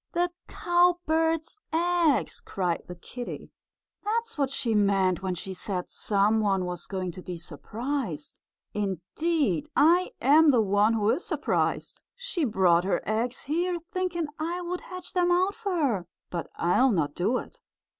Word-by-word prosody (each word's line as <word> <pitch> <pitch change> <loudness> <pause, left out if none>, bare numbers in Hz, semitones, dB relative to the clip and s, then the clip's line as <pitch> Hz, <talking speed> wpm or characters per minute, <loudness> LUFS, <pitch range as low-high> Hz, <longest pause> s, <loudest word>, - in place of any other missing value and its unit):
"The 350 0 +1 0.2
cowbird's 340 -1 +1
eggs!" 335 -3 +2
cried 180 -4 -1
the 180 - -7
kittie. 245 +7 -8 0.5
"That's 455 +2 -1
what 275 -3 0
she 240 -4 -1
meant 195 -3 +2
when 185 -1 -2
she 190 +2 -5
said 185 -1 -4
some 210 +2 +2
one 195 -3 +1
was 175 -1 -5
going 185 -2 -3
to 185 - -9
be 180 -1 -6
surprised. 180 - -5 0.3
Indeed, 210 - -1
I 345 +5 +4
am 300 +5 +6
the 255 -4 +5
one 205 +2 +3
who 215 -1 +2
is 355 - -1
surprised. - - -1
She 485 -10 -2
brought 185 -7 +3
her 195 - 0
eggs 230 +4 -1
here, 345 +4 0
thinking 360 -3 -1
I 335 +3 -2
would 355 +1 -4
hatch 365 0 -9
them 355 -1 +2
out 370 +3 +3
for 410 -5 -3
her, 235 - 0 0.2
but 170 -2 -4
I'll 245 +10 +3
not 150 -7 0
do 205 +10 +1
it!" - - -9
250 Hz, 155 wpm, -27 LUFS, -, 0.5 s, am